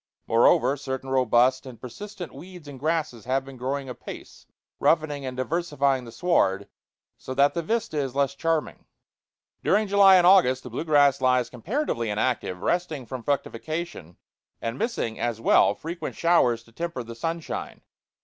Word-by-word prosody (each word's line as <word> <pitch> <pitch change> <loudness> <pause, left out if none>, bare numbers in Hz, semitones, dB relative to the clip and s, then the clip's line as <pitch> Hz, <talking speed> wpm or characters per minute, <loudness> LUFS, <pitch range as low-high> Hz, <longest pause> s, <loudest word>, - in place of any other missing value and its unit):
Moreover, 120 +3 +4
certain 130 -1 -5
robust 130 +1 +3
and 125 -3 -10
persistent 195 - -8
weeds 180 -4 -12
and 140 -2 -9
grasses 155 -6 -2
have 130 +1 0
been 135 -1 -10
growing 135 +2 -3
apace, 125 - -10 0.3
roughening 150 -4 +1
and 125 -1 -6
diversifying 140 -3 0
the 115 - -10
sward, 115 - +1 0.5
so 130 - -7
that 140 +1 +4
the 170 - -1
vista 220 -2 -2
is 135 -2 -3
less 140 -1 +1
charming. 165 +2 -2 0.8
During 210 +2 +2
July 195 -1 +7
and 180 -1 +5
August 170 -9 +5
the 125 - -9
blue 130 +7 -4
grass 145 -3 +4
lies 125 -2 +2
comparatively 130 - -2
inactive, 105 -4 -2
resting 160 -7 -1
from 130 0 -6
fructification, 140 - -4 0.4
and 115 +1 -4
missing, 220 - -2
as 120 -2 -2
well, 100 -3 +4
frequent 165 - -6
showers 125 -9 +2
to 115 - -21
temper 165 0 -4
the 115 0 -9
sunshine. 165 +7 -5
140 Hz, 155 wpm, -25 LUFS, 125-170 Hz, 0.8 s, July